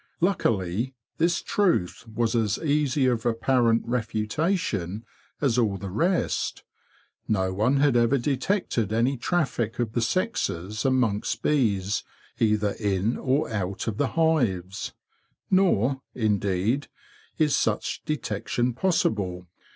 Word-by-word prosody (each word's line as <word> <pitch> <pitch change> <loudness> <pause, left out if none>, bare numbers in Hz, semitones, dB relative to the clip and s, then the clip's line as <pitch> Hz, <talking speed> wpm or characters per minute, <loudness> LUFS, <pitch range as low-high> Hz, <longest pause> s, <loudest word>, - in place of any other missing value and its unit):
Luckily, 115 - 0 0.2
this 170 +1 +2
truth 170 - 0
was 115 +1 0
as 110 -4 +1
easy 145 -3 +1
of 120 -3 +1
apparent 115 0 +2
refutation 110 - -1 0.4
as 125 -4 +2
all 105 -5 +1
the 95 -1 -6
rest. 170 - 0 0.6
No 95 -3 +1
one 110 +8 +2
had 140 -2 +3
ever 120 +3 +4
detected 135 - 0
any 120 +5 +2
traffic 125 - -1
of 120 -3 -1
the 120 - 0
sexes 110 - -1
amongst 125 -6 +1
bees 105 -9 +1 0.4
either 105 -2 +2
in 100 +2 0
or 135 +3 0
out 100 -1 -3
of 105 -2 -2
the 145 - +1
hives; 115 - +1 0.6
nor, 140 - +3
indeed, 105 +3 0 0.5
is 150 -2 +3
such - - -1
detection 120 -3 -1
possible. 105 - 0
115 Hz, 115 wpm, -26 LUFS, 105-140 Hz, 0.6 s, ever